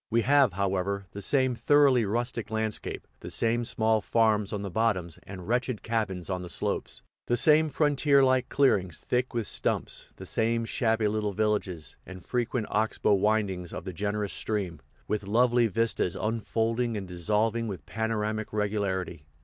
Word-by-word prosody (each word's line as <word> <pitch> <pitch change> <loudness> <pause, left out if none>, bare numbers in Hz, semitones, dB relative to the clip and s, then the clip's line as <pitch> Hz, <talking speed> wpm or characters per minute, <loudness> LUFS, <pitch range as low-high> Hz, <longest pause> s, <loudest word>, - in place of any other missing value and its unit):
We 115 0 +2
have, 140 -5 +4
however, 100 +1 -1
the 100 - -7
same 130 +4 +2
thoroughly 135 -2 +4
rustic 115 +1 -2
landscape, 110 -1 -3
the - - -8
same 115 +1 0
small 110 -1 +1
farms 105 -2 +2
on 105 -1 -3
the 100 - -5
bottoms 95 -6 0
and 95 -3 -8
wretched 125 -1 -1
cabins 105 -6 -2
on 95 -1 -2
the 90 - -7
slopes, - - -2 0.2
the 120 - +2
same 155 +4 +5
frontier 145 -1 +3
like 130 -1 +2
clearings 95 - +2
thick 125 0 -2
with 115 -2 0
stumps, - - -1
the - - -10
same 115 +1 0
shabby 110 -1 +1
little 105 -1 -1
villages, 100 -6 -2
and 95 -1 -11
frequent 120 -2 -1
ox 110 +1 0
bow - - +3
windings 100 -3 0
of - - -6
the 95 - -5
generous 105 +3 -2
stream, 95 -7 -2 0.3
with 105 -2 -2
lovely 120 +2 +3
vistas 110 -4 0
unfolding 115 +1 -1
and 95 -2 -5
dissolving 105 +6 0
with 95 -4 -6
panoramic 110 -1 -2
regularity. 100 -6 -2
110 Hz, 160 wpm, -28 LUFS, 100-115 Hz, 0.3 s, same